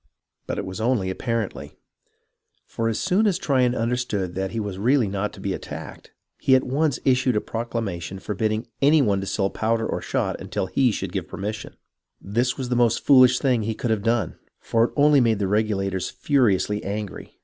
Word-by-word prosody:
But - - -3
it - - -3
was 95 +3 -6
only 110 -6 +1
apparently, 100 - -4 0.9
for 115 0 -2
as 110 - -2
soon 195 +4 +2
as 195 - +2
Tryon 130 -4 +1
understood 115 -6 -1
that 95 +1 -2
he 115 - -4
was 100 -3 -4
not 100 - -6
really 125 -2 +3 0.2
to - - -14
be 95 0 -2
attacked, - - -8 0.3
he 130 - +4
at 130 - +3
once 140 +1 0
issued 130 -2 +3
a - - +3
proclamation 105 -7 -4
forbidding 110 +3 -2 0.2
any 150 +3 +5
one 100 -4 +1
to 95 - -5
sell 95 -1 0
powder 115 0 0
or - - -3
shot - - -2
until - - -3
he 125 +6 +2
should - - -4
give - - -3
permission. 105 +2 -6 0.4
This 120 +6 -1
was 130 -3 -4
the 125 - +1
most 120 -2 +2
foolish 130 -2 +7
thing 125 -4 +1
he 110 +1 -2
could 120 - -2
have 110 -2 +1
done, 115 -4 0 0.2
for 115 0 +2
it - - -6
only 145 -1 +5
made 115 -3 +2
the 100 -1 -1
Regulators 95 -2 0
furiously 105 -7 +1
angry. 105 0 -6
115 Hz, 195 wpm, -23 LUFS, 100-125 Hz, 0.9 s, foolish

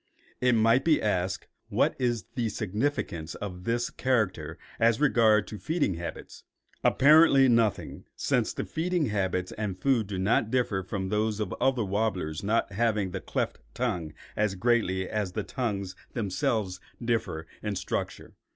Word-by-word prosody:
It 125 -1 +3
might 115 +4 +4
be 160 -2 +4
asked, 95 -3 -1 0.2
what - - +2
is 120 -6 0
the 120 -4 -1
significance 105 - -2
of 90 -3 -7
this 120 +1 0
character 95 - 0 0.2
as 115 0 +4
regards 110 -8 +3
feeding 160 - +1
habits? 85 -1 -7 0.4
Apparently 140 -1 +6
nothing, 115 -4 +1
since - - +1
the - - -4
feeding 170 -4 -1
habits 95 -3 -1
and 100 -4 -3
food 125 -5 +2
do 100 -2 -4
not 105 +3 +2
differ 115 -6 +1
from 95 0 -4
those 105 +1 0
of 105 -4 -2
other 130 -5 +2
warblers 95 -5 -1
not 105 +1 +1
having 105 -3 +1
the 95 - -4
cleft - - -2 0.2
tongue 90 -11 -2 0.2
as 105 -2 +1
greatly 95 -3 +1
as 105 -4 -2
the - - -2
tongues 100 -7 -3 0.2
themselves 105 -3 -1 0.2
differ 115 -9 -1 0.2
in 105 -1 -2
structure. 90 - -4
105 Hz, 145 wpm, -28 LUFS, 95-120 Hz, 0.4 s, Apparently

